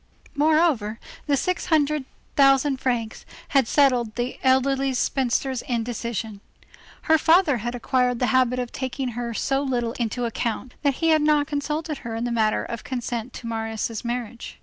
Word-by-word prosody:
Moreover, 290 -8 +2 0.3
the 285 -1 +3
six 365 +6 -1
hundred 300 -3 +2 0.3
thousand 275 0 +4
francs 240 -4 -2 0.3
had 270 -4 +3
settled 250 -6 +2
the 245 +1 -3
elderly 265 0 +2
spinster's 260 0 0
indecision. 230 -3 -3 0.6
Her 320 0 +4
father 320 -4 +4
had 240 +2 -4
acquired 250 0 +1
the 250 - +1
habit 255 -1 +3
of 245 -1 -3
taking 260 0 -3
her 235 -1 -4
so 270 +4 0
little 245 -4 -1
into 240 +1 -1
account, 235 +2 -3
that 280 -3 +1
he - - +4
had 310 -1 +4
not 300 -1 +3
consulted 300 +1 -3
her 230 -2 -6
in 225 - -3
the 240 - -1
matter 220 -2 +1
of 235 - -6
consent 245 -1 -4
to - - -9
Marius' 225 -1 -3
marriage. 240 -1 -5
250 Hz, 160 wpm, -24 LUFS, 235-280 Hz, 0.6 s, thousand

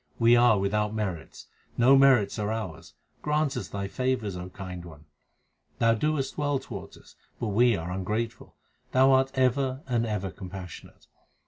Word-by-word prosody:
We 115 +1 +5
are 120 -3 +5
without 105 +2 0
merits; 95 -7 -5 0.3
no 125 +3 +6
merits 135 -7 +4
are 105 0 -1
ours; 110 -8 -6 0.3
grant 150 -1 0
us 125 - -4
Thy 100 -1 -4
favours, 125 -3 -2
O 90 +1 -6
Kind 90 -2 -8
One. 80 -3 -13 0.7
Thou 115 0 +3
doest 140 +4 -1
well 145 -1 +1
towards - - -9
us, - - -18 0.3
but 115 - -2
we 120 +3 +4
are 85 0 -5
ungrateful; 105 +5 -4 0.4
Thou 130 +1 +5
art 130 0 +4
ever 130 +1 +1
and 120 -2 0
ever 100 -3 -3
compassionate. 95 -3 -10
115 Hz, 155 wpm, -27 LUFS, 95-130 Hz, 0.7 s, no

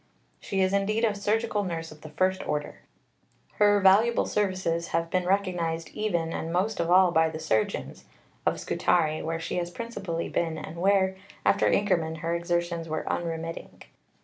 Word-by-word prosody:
She 195 -1 -2
is 190 +1 +2
indeed 215 +3 +1
a 215 - +1
surgical 210 +1 0
nurse 165 -3 -4
of 155 0 -14
the 155 - -9
first 185 +5 0
order. 150 0 -3 0.8
Her 205 -1 +5
valuable 205 +5 +4
services 185 -5 -1
have 165 0 -1
been 180 -1 0
recognized 175 -4 0
even 175 -6 -2
and 165 - -4
most 195 +5 0
of 170 0 0
all 185 0 +6
by 160 -1 +3
the 160 - -6
surgeons 110 -8 -2 0.4
(of - - 0
Scutari, 155 -3 +1
where 165 +1 -3
she 165 - -3
has 175 -1 -1
principally 195 -5 -4
been 165 -2 -1
and 160 +1 -8
where, 190 +1 +2 0.3
after - - +3
Inkerman, 170 -6 +1
her 165 0 -1
exertions 170 -1 -1
were 155 - -3
unremitting). 165 -1 -4
175 Hz, 165 wpm, -27 LUFS, 165-195 Hz, 0.8 s, all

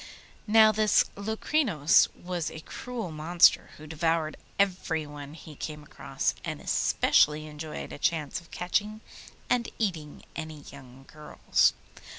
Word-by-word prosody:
Now 220 0 +7
this 215 -1 +3
Locrinos 220 - +2
was 175 -2 -4
a 160 - -9
cruel 230 0 -6
monster 160 +3 +4
who 155 - -11
devoured 160 0 -1 0.2
everyone 155 -7 -2
he 160 -1 -12
came 150 +1 -7
across, - - -3
and - - -4
especially 150 +1 +2
enjoyed 155 0 -7
a - - -9
chance 155 -1 -1
of 165 - -20
catching 210 +4 -2 0.5
and 245 -2 +1
eating 165 -9 -3
any 155 -2 -7
young 135 -1 -14
girls. 150 +1 +1
160 Hz, 125 wpm, -28 LUFS, 150-200 Hz, 0.5 s, Now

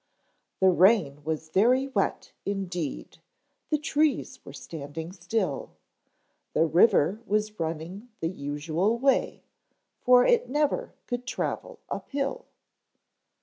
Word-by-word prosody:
The 190 0 +6
rain 175 -7 +3
was 155 0 -3
very 245 +10 +3
wet 270 - -1
indeed, 180 -6 -4 0.5
The 305 - +2
trees 295 -3 0
were - - -10
standing 155 +3 -7
still; 180 -4 -2 0.8
The 165 - +3
river 185 +3 +4
was 215 0 -1
running 165 +8 -4
the 165 - -1
usual 160 +7 -1
way, 270 +2 +1 0.6
For 250 0 +6
it 480 -1 +3
never 295 - 0
could 245 0 -4
travel - - -3
up - - -6
hill. 285 - -2
195 Hz, 110 wpm, -27 LUFS, 160-250 Hz, 0.8 s, The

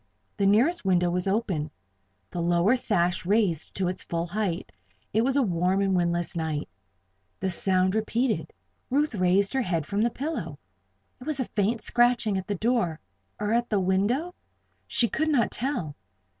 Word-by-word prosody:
The 200 - +2
nearest 250 - +3
window 180 -2 +2
was 180 +1 -1
open 190 -7 -1 0.6
the 175 - -3
lower 175 +7 +3
sash 180 -8 0
raised 190 -4 +1
to 190 -1 0
its 180 - 0
full 170 0 -2
height. 190 -1 -3 0.4
It 220 - +3
was 265 +3 +1
a 280 - +4
warm 180 -1 +1
and 195 -1 +2
windless 175 -1 0
night. 160 -3 -2 0.7
The 190 0 -1
sound 185 +1 +2
was 220 - +2
repeated. 230 +2 -1 0.4
Ruth 290 +2 +1
raised 195 0 +2
her 265 - +1
head 170 - -1
from 200 +3 -1
the 235 - +3
pillow. 240 - -4 0.6
It 250 - -11
was 305 -3 -1
a 260 - 0
faint 215 +2 -1
scratching 240 -3 +3
at 190 -1 -3
the 205 - -1
door, 195 -7 0 0.4
or 210 +1 0
at 240 0 +1
the 210 - +2
window? 205 - 0 0.5
She 235 - +2
could 315 +6 -1
not 255 -7 +2
tell. 215 - -2
200 Hz, 170 wpm, -26 LUFS, 175-235 Hz, 0.7 s, a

